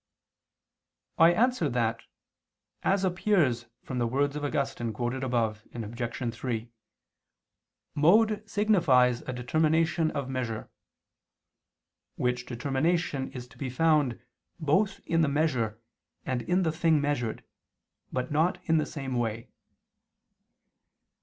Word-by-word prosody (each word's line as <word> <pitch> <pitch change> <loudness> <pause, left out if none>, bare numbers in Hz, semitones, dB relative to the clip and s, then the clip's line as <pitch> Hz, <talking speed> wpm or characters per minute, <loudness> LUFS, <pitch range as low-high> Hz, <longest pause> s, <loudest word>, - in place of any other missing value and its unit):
I 165 +1 +8
answer 225 - +2
that, 115 -2 0 0.8
As 195 0 +1
appears 175 - +1 0.2
from 130 -2 -4
the 120 - +1
words 140 +4 0
of 150 - -4
Augustine 135 -5 -2
quoted 125 +3 -2
above 115 -4 0
(Obj. 120 +1 -4
3) 115 -1 -4 1.2
mode 210 +8 +4
signifies 155 - +3
a - - -5
determination 160 +6 +1
of 140 -4 -3
measure; 125 -4 -4 1.4
which 125 0 -1
determination 135 +3 -1
is 125 -1 -7
to - - -19
be 135 - -3
found 150 -2 +2 0.4
both 170 +7 +1
in 165 0 +2
the 155 - +3
measure 130 -8 0 0.5
and 130 -2 -1
in 180 +7 +1
the 160 - +1
thing 160 -1 +2
measured, 140 -6 -1 0.7
but 125 +1 -2
not 160 +5 +2
in 160 -1 +3
the 155 - -1
same 135 -3 -5
way. 115 -2 -2
135 Hz, 115 wpm, -28 LUFS, 120-165 Hz, 1.4 s, I